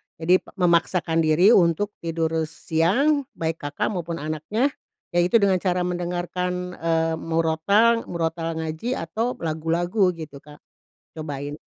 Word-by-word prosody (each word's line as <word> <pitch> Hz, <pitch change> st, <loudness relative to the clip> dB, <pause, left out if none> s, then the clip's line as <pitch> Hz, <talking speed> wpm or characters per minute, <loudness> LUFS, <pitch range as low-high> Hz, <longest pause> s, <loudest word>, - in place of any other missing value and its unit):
jadi 175 Hz, +3 st, +3 dB
p -, -, -36 dB
memaksakan 170 Hz, -2 st, +2 dB
diri 160 Hz, +6 st, +5 dB
untuk 195 Hz, +1 st, +3 dB
tidur 165 Hz, -1 st, -2 dB, 0.2 s
siang 210 Hz, -, +1 dB
baik 165 Hz, 0 st, -2 dB
Kakak 145 Hz, 0 st, -2 dB
maupun 170 Hz, -4 st, -4 dB
anaknya, 155 Hz, -, -1 dB, 0.5 s
yaitu 175 Hz, +6 st, +4 dB
dengan 195 Hz, -2 st, +4 dB
cara 180 Hz, -1 st, 0 dB
mendengarkan, 180 Hz, 0 st, -3 dB
eee, 165 Hz, 0 st, 0 dB
murotal 165 Hz, +8 st, +2 dB
murotal 165 Hz, -1 st, -2 dB
ngaji 160 Hz, +10 st, -3 dB
atau 215 Hz, +8 st, -2 dB, 0.2 s
lagu-lagu 170 Hz, +5 st, +1 dB
gitu 155 Hz, -4 st, -9 dB
Kak, 150 Hz, 0 st, -14 dB, 0.6 s
cobain. 145 Hz, -2 st, -5 dB
170 Hz, 125 wpm, -24 LUFS, 160-185 Hz, 0.6 s, diri